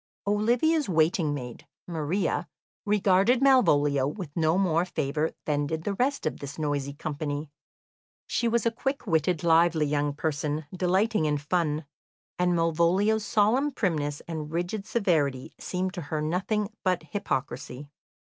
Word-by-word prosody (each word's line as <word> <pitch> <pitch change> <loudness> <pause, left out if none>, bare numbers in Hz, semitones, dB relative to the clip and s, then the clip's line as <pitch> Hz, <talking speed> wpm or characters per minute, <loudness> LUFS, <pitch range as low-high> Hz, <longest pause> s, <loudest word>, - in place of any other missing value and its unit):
Olivia's 240 +8 +2
waiting 160 -1 +2
maid, 125 -5 -6 0.2
Maria, 170 +3 -1 0.4
regarded 205 +3 +3
Malvolio 145 - +4
with 150 -2 -6
no 160 +1 +2
more 175 -3 +2
favour 155 -2 -1 0.2
than 145 -1 0
did 160 +1 -3
the 205 - -1
rest 265 +4 0
of 155 - -2
this 140 0 -7
noisy 145 -2 -1
company. 145 -1 -4 0.7
She 235 - 0
was 235 0 +1
a 230 - +3
quick 270 +4 -3
witted, 165 -2 +1
lively 165 -1 +4
young 145 0 0
person, 150 0 -2
delighting 185 +1 +1
in 150 -1 +1
fun, 150 0 -1 0.5
and 180 0 +2
Malvolio's 170 +6 +2
solemn 225 +8 +2
primness 155 - -1
and 155 -2 -5
rigid 175 +5 -3
severity 150 - 0
seemed 185 0 -2
to 180 - -5
her 155 0 -3
nothing 190 +7 -1
but 180 -3 +1
hypocrisy. 135 - -4
170 Hz, 135 wpm, -27 LUFS, 150-205 Hz, 0.7 s, Malvolio